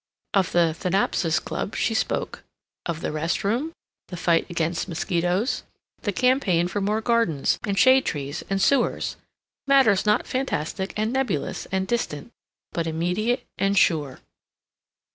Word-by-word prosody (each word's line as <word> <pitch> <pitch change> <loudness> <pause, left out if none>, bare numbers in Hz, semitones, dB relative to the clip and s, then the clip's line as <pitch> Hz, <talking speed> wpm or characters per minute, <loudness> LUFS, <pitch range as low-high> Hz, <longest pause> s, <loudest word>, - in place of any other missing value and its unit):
Of 190 -4 +2
the 170 -2 +3
Thanatopsis 175 -1 +1
Club 205 - -4
she 225 - 0
spoke; 220 - -2 0.4
of 165 -1 -3
the - - -2
rest 155 +2 -1
room, 240 +11 0 0.4
the 180 - -7
fight 170 0 +2
against 170 0 -1
mosquitos, 180 - 0 0.4
the 205 - -1
campaign 200 -7 +2
for 205 +3 -3
more 210 +3 0
gardens 230 - +1
and 200 -1 -1
shade 260 +2 +6
trees 145 -1 -4
and 195 0 0
sewers 255 +5 +1 0.5
matters 245 -8 +4
not 210 - +3
fantastic 195 - -2
and 215 +3 0
nebulous 250 - -2
and 190 0 -1
distant, 230 -5 -2 0.4
but 165 -1 -2
immediate 180 +9 -1
and 195 0 +1
sure. 150 -8 +2
190 Hz, 140 wpm, -24 LUFS, 165-225 Hz, 0.5 s, shade